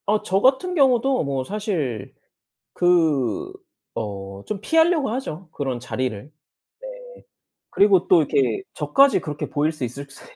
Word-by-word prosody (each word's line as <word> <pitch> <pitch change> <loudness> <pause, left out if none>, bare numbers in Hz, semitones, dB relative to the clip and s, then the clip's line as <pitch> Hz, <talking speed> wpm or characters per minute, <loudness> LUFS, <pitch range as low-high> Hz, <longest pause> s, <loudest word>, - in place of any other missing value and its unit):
어 - - -1
저 195 +2 +1
같은 275 +8 +2
경우도 265 - +3
뭐 135 -2 -2
사실 175 - -4 0.6
그 175 - +1 0.4
어 100 -2 -6
좀 205 -2 -4
피하려고 320 +1 +2
하죠 190 -9 -5
그런 130 -5 -3
자리를. 125 +1 -4 0.5
네. - - -7 0.8
그리고 200 -3 +4
또 175 -3 +6
이렇게 130 -6 0
저까지 265 - +3
그렇게 150 -2 -5
보일 150 +2 0
수 150 -5 -5
있을 140 +4 -6
수 135 - -13
160 Hz, 255 characters per minute, -22 LUFS, -, 0.8 s, 또